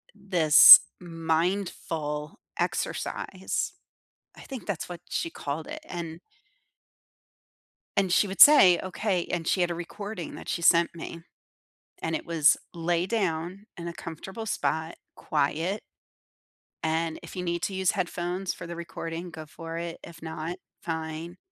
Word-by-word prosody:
this 180 -7 +9 0.2
mindful 165 -3 -2 0.2
exercise. 190 0 -2 0.6
I - - -13
think 265 -4 -8
that's 200 -5 -3
what 175 -1 -7
she 335 - -2
called 155 - -5
it, - - -6
and 170 -1 -6 1.8
And 195 -2 +2
she 200 - +4
would 190 0 -2
say, 235 -13 +9
"Okay" 185 -1 -1
And 170 -2 -2
she 185 - +2
had 175 - +2
a - - -2
recording 185 +1 -6
that - - -9
she 170 - -2
sent 170 0 +4
me, 165 0 -7 0.8
and 160 - -1
it - - -3
was: 165 -3 +4 0.2
"Lay 170 0 0
down 185 -2 -2
in 170 0 -6
a 170 - -5
comfortable 190 +7 -8
spot, 160 -4 -1 0.2
quiet. 160 +7 -1 1.0
And 160 0 -1
if - - -11
you 180 - -3
need 170 -1 -2
to 195 - -1
use 190 -1 +2
headphones 180 -1 -2
for - - -9
the 170 - -6
recording, 170 0 -6
go 160 -1 -8
for 165 +2 -8
it. 170 0 -5
If 165 -1 -13
not, 160 +1 -5 0.3
fine." 160 +1 -5
170 Hz, 140 wpm, -27 LUFS, 160-185 Hz, 1.8 s, this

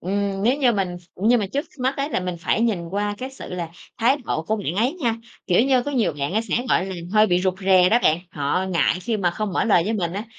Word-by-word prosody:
Ừm, 195 +1 -2
nếu 250 +5 +3
như 255 -4 +3
mình 190 -4 -2 0.2
nhưng 225 +4 +3
mà 200 - -1
trước 285 +4 -1
mắt 260 +2 0
á 275 +1 -1
là 245 - -1
mình 180 -1 -4
phải 200 - 0
nhìn 200 -8 0
qua 205 +1 -1
cái 260 +1 -5
sự 265 -8 -8
là 170 -2 -4 0.3
thái 250 +5 +3
độ 155 - -2
của 215 +6 -1
bạn 190 -6 -3
ấy 245 +7 +2
nha. 235 -10 -1 0.3
Kiểu 180 +3 +4
như, 260 -2 +3
có 290 - -4
nhiều 225 - +1
bạn 140 +5 -2
á 220 - +2
sẽ, - - 0
gọi 185 - +2
là, 190 - -5 0.2
hơi 215 0 +5
bị 180 -1 +2
rụt 185 0 0
rè 185 -1 +5
đó 235 - +4
bạn, 155 - +3
họ 145 +5 -1
ngại 170 +1 +2
khi 225 +2 -1
mà 180 -4 +1
không 205 +3 -3
mở - - +1
lời 200 -7 +4
với 215 - -1
mình 175 -6 -1
á, 200 +3 -4
200 Hz, 275 wpm, -22 LUFS, 180-235 Hz, 0.3 s, hơi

